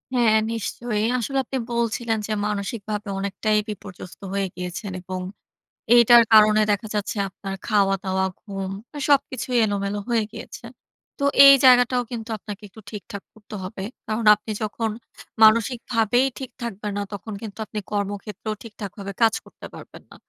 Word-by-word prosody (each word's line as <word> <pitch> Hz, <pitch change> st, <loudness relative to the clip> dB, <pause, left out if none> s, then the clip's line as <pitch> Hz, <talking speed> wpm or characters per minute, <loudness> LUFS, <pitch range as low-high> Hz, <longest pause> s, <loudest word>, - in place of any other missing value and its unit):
হ্যাঁ, 225 Hz, -3 st, +4 dB
নিশ্চয়ই। 225 Hz, -1 st, -2 dB
আসলে 270 Hz, +3 st, -2 dB
আপনি 265 Hz, +2 st, -4 dB
বলছিলেন 235 Hz, -1 st, 0 dB
যে, 220 Hz, -, -5 dB, 0.2 s
মানসিকভাবে 210 Hz, +1 st, -4 dB
অনেকটাই 205 Hz, +2 st, 0 dB
বিপর্যস্ত 195 Hz, -3 st, -9 dB
হয়ে 200 Hz, -1 st, 0 dB
গিয়েছেন। 180 Hz, +3 st, -5 dB
এবং 185 Hz, +1 st, -5 dB, 0.8 s
এইটার 240 Hz, 0 st, +8 dB
কারণে 215 Hz, 0 st, +7 dB
দেখা 205 Hz, +2 st, -1 dB
যাচ্ছে 210 Hz, +1 st, -2 dB
আপনার 195 Hz, +1 st, -7 dB
খাওয়া 200 Hz, -3 st, +3 dB
দাওয়া, 190 Hz, -1 st, 0 dB, 0.2 s
ঘুম 195 Hz, -2 st, -5 dB, 0.3 s
এ -, -, -4 dB
সবকিছুই 265 Hz, -3 st, +1 dB
এলোমেলো 200 Hz, 0 st, -2 dB
হয়ে 230 Hz, -2 st, +2 dB
গিয়েছে। -, -, -9 dB, 0.5 s
তো -, -, -2 dB, 0.2 s
এই 275 Hz, -, +11 dB
জায়গাটাও 250 Hz, 0 st, +5 dB
কিন্তু 230 Hz, -2 st, -6 dB
আপনাকে 205 Hz, +1 st, -9 dB
একটু 220 Hz, +3 st, -14 dB
ঠিকঠাক 205 Hz, -1 st, -8 dB
করতে 215 Hz, 0 st, -11 dB
হবে। 190 Hz, +1 st, -6 dB, 0.2 s
কারণ 220 Hz, +1 st, -2 dB
আপনি 215 Hz, +1 st, -8 dB
যখন 220 Hz, +1 st, -2 dB, 0.5 s
মানসিকভাবেই 230 Hz, +2 st, +3 dB
ঠিক 265 Hz, -2 st, -6 dB
থাকবেন 210 Hz, -2 st, -4 dB
না, -, -, -1 dB
তখন 205 Hz, +2 st, -7 dB
কিন্তু 215 Hz, -2 st, -8 dB
আপনি 210 Hz, +1 st, -5 dB
কর্মক্ষেত্রেও 205 Hz, +1 st, -3 dB
ঠিকঠাকভাবে 200 Hz, -3 st, -7 dB
কাজ 225 Hz, -1 st, +5 dB
করতে -, -, -13 dB
পারবেন -, -, -12 dB
না। -, -, -13 dB
215 Hz, 150 wpm, -23 LUFS, 200-230 Hz, 0.8 s, এই